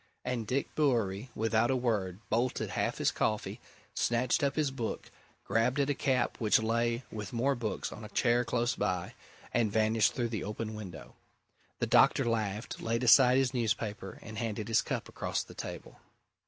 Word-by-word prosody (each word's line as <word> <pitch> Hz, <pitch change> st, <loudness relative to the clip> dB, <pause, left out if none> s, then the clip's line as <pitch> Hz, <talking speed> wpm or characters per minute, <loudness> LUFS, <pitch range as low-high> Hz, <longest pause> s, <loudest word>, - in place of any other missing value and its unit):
And 120 Hz, -3 st, -2 dB
Dick 135 Hz, +4 st, -1 dB
Bewery, 120 Hz, -6 st, +1 dB
without 115 Hz, +1 st, +2 dB
a 130 Hz, -, +2 dB
word, 105 Hz, -7 st, -1 dB
bolted 120 Hz, +3 st, 0 dB
half -, -, -1 dB
his -, -, +2 dB
coffee, 105 Hz, -1 st, -1 dB, 0.3 s
snatched 120 Hz, +1 st, +1 dB
up 140 Hz, -, +1 dB
his 150 Hz, -3 st, +1 dB
book, 120 Hz, -4 st, -4 dB, 0.3 s
grabbed 120 Hz, +5 st, +1 dB
at 140 Hz, 0 st, +2 dB
a -, -, +2 dB
cap 130 Hz, -2 st, 0 dB
which 110 Hz, -3 st, +4 dB
lay 115 Hz, +2 st, 0 dB
with 105 Hz, -3 st, -6 dB
more 130 Hz, +4 st, +1 dB
books 120 Hz, -4 st, -3 dB
on 110 Hz, -, -9 dB
a 105 Hz, -, -8 dB
chair 120 Hz, 0 st, +2 dB
close 120 Hz, +1 st, 0 dB
by, 90 Hz, -4 st, -2 dB, 0.4 s
and 115 Hz, -3 st, +2 dB
vanished 110 Hz, 0 st, +2 dB
through 120 Hz, -2 st, -1 dB
the 110 Hz, -5 st, -3 dB
open 110 Hz, +2 st, -4 dB
window. 95 Hz, -6 st, -9 dB, 0.6 s
The -, -, 0 dB
doctor -, -, +5 dB
laughed, 110 Hz, -2 st, -2 dB
laid 115 Hz, +2 st, -1 dB
aside 125 Hz, +1 st, +7 dB
his 135 Hz, -1 st, +2 dB
newspaper, 115 Hz, -2 st, -2 dB
and 110 Hz, -1 st, -7 dB
handed 110 Hz, -1 st, -3 dB
his 115 Hz, -, +4 dB
cup -, -, -3 dB
across -, -, -2 dB
the -, -, -13 dB
table. -, -, -8 dB
115 Hz, 175 wpm, -31 LUFS, 110-125 Hz, 0.6 s, aside